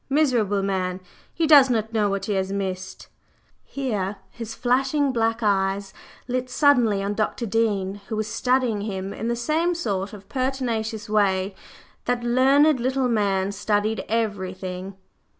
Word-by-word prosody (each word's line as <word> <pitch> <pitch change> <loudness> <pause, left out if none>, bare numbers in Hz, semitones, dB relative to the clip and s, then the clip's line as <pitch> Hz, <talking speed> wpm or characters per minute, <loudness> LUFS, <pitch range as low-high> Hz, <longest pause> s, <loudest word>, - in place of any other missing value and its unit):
Miserable 240 -9 +2
man! 185 -2 -1 0.3
He 335 - 0
does 285 -4 +7
not 225 -2 -1
know 210 -2 +2
what 200 0 -2
he 210 - -1
has 190 0 -1
missed!" 190 -1 -4 0.6
Here 210 -8 -3 0.2
his 230 -2 -7
flashing 270 +3 +1
black 225 -1 0
eyes 195 -1 0 0.3
lit 255 0 -2
suddenly 245 -7 +3
on 200 +1 -1
Dr. 215 +3 -1
Dean, 205 -3 0
who 220 - -3
was 215 0 -2
"studying" 250 -2 +1
him 195 -2 -4
in 225 - -4
the 235 - 0
same 315 +8 0
sort 200 - -2
of 200 -2 -12
pertinacious 240 -5 -2
way 200 -3 +2
in 190 - -5
which - - -26 0.5
that 245 -1 0
learned 265 +4 +4
little 260 +1 0
man 200 -3 +1
studied 210 +2 0
everything. 190 -4 -3
220 Hz, 150 wpm, -24 LUFS, 195-250 Hz, 0.6 s, does